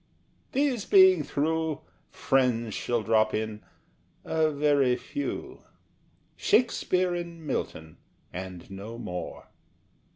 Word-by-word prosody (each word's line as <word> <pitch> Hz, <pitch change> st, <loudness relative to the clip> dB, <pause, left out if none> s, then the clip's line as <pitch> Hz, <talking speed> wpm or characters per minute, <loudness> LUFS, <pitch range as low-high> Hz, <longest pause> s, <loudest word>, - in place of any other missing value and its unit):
These 265 Hz, -6 st, +1 dB
being 375 Hz, -1 st, +7 dB
through, 160 Hz, +1 st, -1 dB, 0.3 s
Friends 120 Hz, -4 st, +1 dB
shall 120 Hz, -2 st, -1 dB
drop 110 Hz, 0 st, +3 dB
in, 110 Hz, -1 st, -3 dB, 0.6 s
a 160 Hz, -1 st, +2 dB
very 145 Hz, -3 st, +3 dB
few 285 Hz, -, -5 dB, 0.7 s
Shakespeare 185 Hz, -, +2 dB
and 170 Hz, -2 st, -6 dB
Milton, 80 Hz, -, -4 dB, 0.4 s
and 90 Hz, 0 st, -7 dB
no 105 Hz, +4 st, -7 dB
more. 90 Hz, -7 st, -6 dB
135 Hz, 95 wpm, -28 LUFS, 110-170 Hz, 0.7 s, being